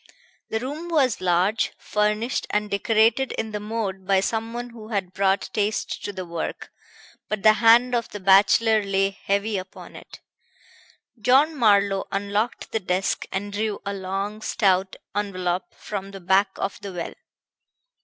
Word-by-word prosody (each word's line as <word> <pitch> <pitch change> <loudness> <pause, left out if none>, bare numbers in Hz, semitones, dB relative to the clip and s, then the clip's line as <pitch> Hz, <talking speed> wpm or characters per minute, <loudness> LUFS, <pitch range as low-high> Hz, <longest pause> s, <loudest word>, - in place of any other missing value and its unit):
The 220 - -1
room 295 +8 -5
was 275 - +2
large, 185 +4 +1
furnished 210 +4 -1
and 210 0 -1
decorated 225 +5 +2
in 220 -1 -3
the 210 - -3
mode 205 -3 -4
by 195 -1 +4
someone 230 +4 -3
who 225 -2 -11
had 195 -5 -3
brought 195 +1 +1
taste 210 0 -1
to - - -3
the 185 -2 -6
work; 170 -1 -5 0.6
but 215 -2 -3
the 215 0 +8
hand 240 +2 +6
of 235 -1 0
the 205 - -7
bachelor 205 +3 +5
lay 195 -1 +1
heavy 200 +1 -1
upon 185 0 -11
it. - - -12 1.0
John 275 +7 +4
Marlowe 200 -5 +3
unlocked 205 +4 -2
the 225 - 0
desk 185 0 -1
and 200 +1 -3
drew 215 0 -2
a 200 - -2
long, 195 +2 -4
stout 190 -3 +1 0.2
envelop 185 -3 -2
from 195 -2 -6
the 195 0 -9
back 190 +2 +3
of 195 - -3
the 200 - -6
well. 175 -1 -5
205 Hz, 155 wpm, -24 LUFS, 195-225 Hz, 1.0 s, the